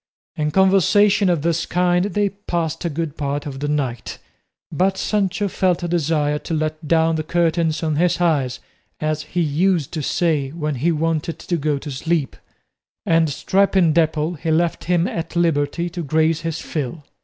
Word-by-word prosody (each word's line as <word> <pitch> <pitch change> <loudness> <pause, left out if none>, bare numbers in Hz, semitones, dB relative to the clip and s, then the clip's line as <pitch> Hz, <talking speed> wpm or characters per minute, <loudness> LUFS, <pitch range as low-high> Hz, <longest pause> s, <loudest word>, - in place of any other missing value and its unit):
In 150 0 -1
conversation 195 +3 +4
of 170 -5 +1
this 170 0 0
kind 180 0 +2
they 205 0 0
passed 170 -5 -3
a - - +1
good 160 0 -4
part 145 0 -2
of 135 -2 -6
the 145 - -2
night, 130 -6 -2 0.5
but 190 +4 +1
Sancho 205 0 0
felt 185 -2 0
a - - -1
desire 150 -3 0
to 165 - -4
let 155 0 -3
down 160 0 +3
the 155 - -2
curtains 165 0 0
of 155 -2 0
his 175 +2 +2
eyes, 145 -8 +1 0.4
as 155 0 -1
he 165 +3 -3
used 165 0 +1
to 160 - -3
say 150 -2 0
when 155 -2 -2
he 145 +6 +1
wanted 165 0 -1
to 175 - -3
go 150 -2 0
to 145 +1 -7
sleep; 150 +1 -1 0.7
and 165 -1 +3
stripping 190 +2 +2
Dapple 160 0 +1
he 165 0 -4
left 165 +1 +1
him 175 0 +2
at 165 +1 -5
liberty 165 0 +1
to 175 0 -5
graze 160 +1 +1
his 165 -1 -3
fill. 150 +1 -4
165 Hz, 175 wpm, -21 LUFS, 150-175 Hz, 0.7 s, conversation